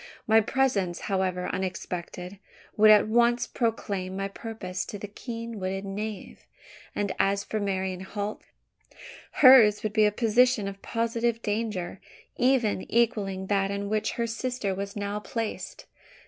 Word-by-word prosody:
My 220 0 +5
presence, 210 -8 0
however 185 -2 -1
unexpected, 185 0 -5 0.4
would 215 0 +6
at 215 0 +7
once 240 +2 +3
proclaim 200 -5 -2
my 195 0 -2
purpose 195 -4 -5
to 205 - -6
the 205 - -7
keen 230 +1 -7
witted 190 +1 -3
knave; 205 +1 -6 0.5
and 200 -2 -1
as 200 +1 +2
for 215 - -3
Marian 190 -2 -2
Holt, 205 +2 -5 0.9
hers 250 -6 +7
would 215 -1 -2
be 215 -1 +4
a 210 - +3
position 230 0 +3
of 195 0 -7
positive 230 0 -1
danger 205 -4 -3 0.3
even 245 -6 +1
equalling 210 -5 +1
that 195 0 +1
in 200 0 -3
which 215 0 0
her 235 - -1
sister 230 -3 -2
was 200 +1 -5
now 205 0 -3
placed. 225 +1 -5
210 Hz, 140 wpm, -27 LUFS, 195-230 Hz, 0.9 s, at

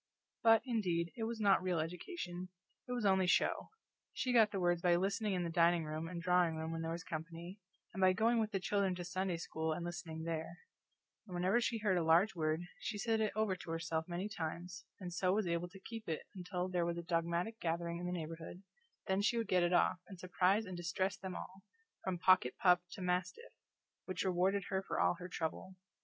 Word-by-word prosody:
But, 225 -1 +6
indeed, 180 -9 0
it 225 - -2
was 230 0 -3
not 200 -3 +4
real 180 -2 0
education; 180 - -5 0.4
it - - -6
was 245 -3 -1
only 190 -2 +4
show: - - +2 0.4
she 255 -1 -1
got 225 -3 +6
the 200 -2 -3
words 175 -1 +2
by 175 -1 +4
listening 200 +3 0
in 180 - 0
the 170 - -2
dining 170 0 +4
room 155 +1 -4
and 170 0 -5
drawing 175 -1 +3
room 160 +1 -3
when 165 0 -3
there 165 - -2
was 170 +2 -4
company, 165 +4 -6 0.3
and 190 - -4
by 185 0 +7
going 225 +5 +3
with 220 -1 +1
the 195 - 0
children 195 0 +1
to 180 - -5
Sunday 185 0 -1
school 160 -1 -2
and 170 +2 -4
listening 170 -2 -5
there; 165 +1 -3 0.7
and 180 - -7
whenever 185 +7 +2
she 230 0 0
heard 205 -4 +2
a - - 0
large 170 +6 +5
word 155 -1 0 0.2
she 215 - -3
said 220 +2 +1
it 215 - +1
over 215 -3 +1
to 175 - -10
herself 165 -1 -2
many 180 +3 -3
times, 180 -1 -5
and 180 -3 -6
so 185 +1 +2
was 210 0 +1
able 170 0 -1
to 195 +2 -13
keep 225 +1 -8
it 160 - -2
until 180 -1 -3
there 180 -2 0
was 170 0 -1
a 170 - -4
dogmatic 170 +5 -1
gathering 170 -2 -2
in 180 - -3
the - - -2
neighborhood, 165 +2 -6 0.4
then 190 0 +1
she 225 +3 +2
would 230 - -1
get 180 -1 +3
it 175 0 +2
off, 180 0 +3
and 190 -3 -10
surprise 185 +4 +2
and 185 -2 -6
distress 175 +3 -1
them 190 -2 -6
all, 190 +1 -8 0.4
from 185 -1 -1
pocket 185 -8 +4
pup 180 -1 +5
to 190 - -6
mastiff, 180 - -2 0.5
which 185 -2 -2
rewarded 190 +2 +2
her 190 -1 0
for - - -3
all - - +4
her 180 0 -7
trouble. 180 +2 -4
180 Hz, 220 wpm, -36 LUFS, 170-195 Hz, 0.7 s, by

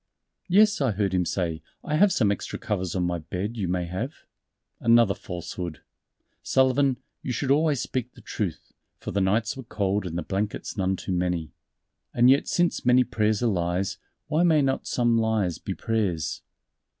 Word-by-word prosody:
"Yes," 210 0 +4
I 130 -6 +2
heard 100 -1 0
him 90 -1 +2
say, 85 -4 -2 0.2
"I 150 - -1
have 195 +5 +5
some 105 - +2
extra 100 - -4
covers 95 -4 -3
on 90 - +1
my 90 -1 -1
bed 95 +8 -4
you 100 -5 -2
may 90 0 -1
have." 95 - -3 0.7
"Another 115 -3 +5
falsehood. 90 -2 -6 0.6
Sullivan, 130 0 +2 0.2
you 130 - -4
should 130 +3 -1
always 150 -2 +3
speak 130 -3 -3
the - - -14
truth." - - -4 0.2
For - - -6
the 100 - 0
nights 110 +4 +1
were 135 - -7
cold 100 -4 -1
and 85 0 -4
the 85 - -2
blankets 100 +4 -3
none 95 -2 0
too 95 - -6
many. 90 -3 -1 0.6
And 120 +2 +6
yet 140 - +3
since 175 0 +1
many 125 +1 +5
prayers 110 -1 0
are - - +2
lies, 90 -2 0 0.3
why 155 +2 +1
may 160 -4 +4
not 135 0 -1
some 120 -2 +2
lies 110 -7 0
be - - -5
prayers? 95 -9 -1
105 Hz, 175 wpm, -26 LUFS, 90-130 Hz, 0.7 s, And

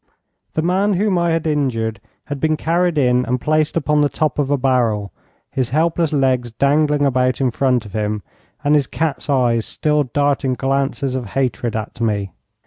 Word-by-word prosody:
The 155 - -1
man 190 +4 +2
whom 195 -1 +1
I 170 0 +1
had 165 -1 0
injured 115 -8 -1 0.2
had 145 -1 -5
been 155 +1 +1
carried 170 +1 +1
in 125 -2 +3
and 125 +1 0
placed 155 +3 +1
upon 150 -1 +2
the 145 - +3
top 150 +1 -1
of 140 -2 0
a 145 - +2
barrel, 120 -7 +1 0.4
his 130 -3 -1
helpless 160 +3 +1
legs 130 -4 +1
dangling 145 +4 +2
about 130 -2 +1
in 130 -2 +1
front 125 -2 +1
of 100 - -11
him, 105 -1 -2 0.4
and 145 0 +3
his 145 -3 +3
cat's 155 -4 -3
eyes 120 -4 +2
still 150 +3 0
darting 140 0 0
glances 135 0 -1
of 130 -3 -3
hatred 120 -3 -1
at 110 +2 -5
me. 100 -4 -1
135 Hz, 180 wpm, -19 LUFS, 125-150 Hz, 0.4 s, in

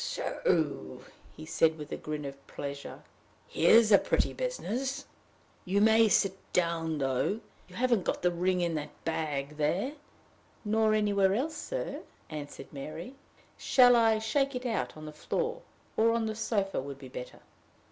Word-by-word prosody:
"So!" - - -1 0.3
he 155 - -8
said, 160 0 +2
with 150 -1 -8
a - - -1
grin 150 -1 -5
of 140 0 -9
pleasure. 140 0 -7 0.4
"Here's 220 +6 +5
a 200 - +8
pretty - - 0
business! 275 - -3 0.6
You 195 +2 +1
may 220 +1 +6
sit 195 -1 +3 0.2
down, 165 -2 0
though. 135 - 0 0.3
You - - -15
haven't 240 -5 +2
got - - -2
the 180 - +3
ring 180 +1 0
in 170 -1 0
that 150 -1 -6
bag 150 -3 -2
there?" 175 - 0 0.7
"Nor 215 0 +3
anywhere 200 -2 +3
else, 295 +8 -1
sir," - - -4 0.3
answered 150 -1 -8
Mary. 155 - -7 0.5
"Shall 245 -2 +6
I 225 -2 +4
shake 275 +5 0
it 250 +1 -4
out 225 -9 -2
on 155 - -9
the 155 - -7
floor? 475 - -2 0.3
or 230 +1 +4
on 230 -1 0
the 220 - -2
sofa 210 - -1
would 140 0 -7
be 135 -1 -10
better." 125 -1 -8
195 Hz, 155 wpm, -30 LUFS, 155-230 Hz, 0.7 s, a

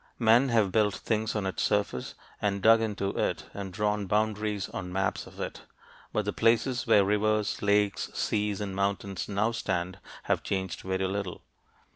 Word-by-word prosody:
Men 120 +3 +5
have 110 -5 +3
built 105 -2 +2
things 110 +2 -1
on 105 -2 -1
its 95 - -2
surface 105 -11 0 0.3
and 100 -2 0
dug 115 0 +7
into 105 -3 -1
it - - -1
and 100 -2 -5
drawn 105 +1 -1
boundaries 105 -1 0
on 90 -2 -5
maps 95 +1 -1
of - - -14
it, - - -5 0.5
but 105 - 0
the 105 - -1
places 120 +2 +2
where 105 -3 +6
rivers, 105 +1 +1
lakes, 105 0 +2
seas, 105 -1 0
and 100 -2 -4
mountains 100 -2 -2
now 105 +3 +1
stand 95 -5 -2 0.2
have - - +1
changed 95 -1 -3
very 95 0 -1
little. 95 -1 -3
105 Hz, 165 wpm, -28 LUFS, 95-110 Hz, 0.5 s, dug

